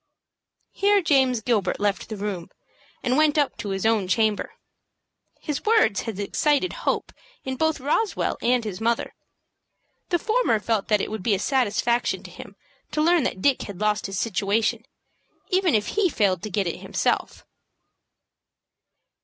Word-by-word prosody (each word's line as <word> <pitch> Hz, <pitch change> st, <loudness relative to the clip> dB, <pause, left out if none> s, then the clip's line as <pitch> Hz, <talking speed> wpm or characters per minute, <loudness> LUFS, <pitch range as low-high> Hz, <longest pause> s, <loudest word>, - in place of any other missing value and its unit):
Here 405 Hz, +1 st, +3 dB
James 265 Hz, -, +2 dB
Gilbert 210 Hz, -5 st, 0 dB
left 205 Hz, +1 st, -1 dB
the 215 Hz, -, -5 dB
room, 195 Hz, -4 st, -4 dB, 0.5 s
and 250 Hz, +2 st, +1 dB
went 310 Hz, 0 st, +3 dB
up 290 Hz, -2 st, +2 dB
to 205 Hz, -, -5 dB
his 195 Hz, +1 st, -2 dB
own 220 Hz, -4 st, +2 dB
chamber. 215 Hz, +2 st, +1 dB, 0.9 s
His 300 Hz, -2 st, -3 dB
words 430 Hz, -, +3 dB
had 205 Hz, -3 st, -6 dB
excited 295 Hz, -, +1 dB
hope -, -, -2 dB, 0.3 s
in 265 Hz, 0 st, -3 dB
both 315 Hz, +2 st, 0 dB
Roswell 305 Hz, -, 0 dB
and 245 Hz, 0 st, +2 dB
his 210 Hz, -2 st, -6 dB
mother. 230 Hz, +1 st, 0 dB, 1.0 s
The 350 Hz, -, +2 dB
former 430 Hz, -, +1 dB
felt 215 Hz, -1 st, -1 dB
that 210 Hz, -3 st, +2 dB
it -, -, -4 dB
would 220 Hz, -2 st, -4 dB
be 205 Hz, +2 st, +2 dB
a -, -, -1 dB
satisfaction 240 Hz, +1 st, 0 dB
to -, -, -11 dB
him -, -, -11 dB, 0.4 s
to -, -, -1 dB
learn 335 Hz, +2 st, +4 dB
that 185 Hz, -, -3 dB
Dick 275 Hz, -2 st, +3 dB
had 200 Hz, -3 st, -7 dB
lost 210 Hz, -1 st, 0 dB
his 195 Hz, 0 st, -5 dB
situation, 220 Hz, +3 st, 0 dB, 0.6 s
even 370 Hz, -, +2 dB
if 210 Hz, -1 st, 0 dB
he 415 Hz, -3 st, +2 dB
failed 195 Hz, -, +1 dB
to 215 Hz, -, -5 dB
get 200 Hz, 0 st, 0 dB
it 170 Hz, -, -3 dB
himself. -, -, -2 dB
230 Hz, 160 wpm, -24 LUFS, 205-295 Hz, 1.0 s, learn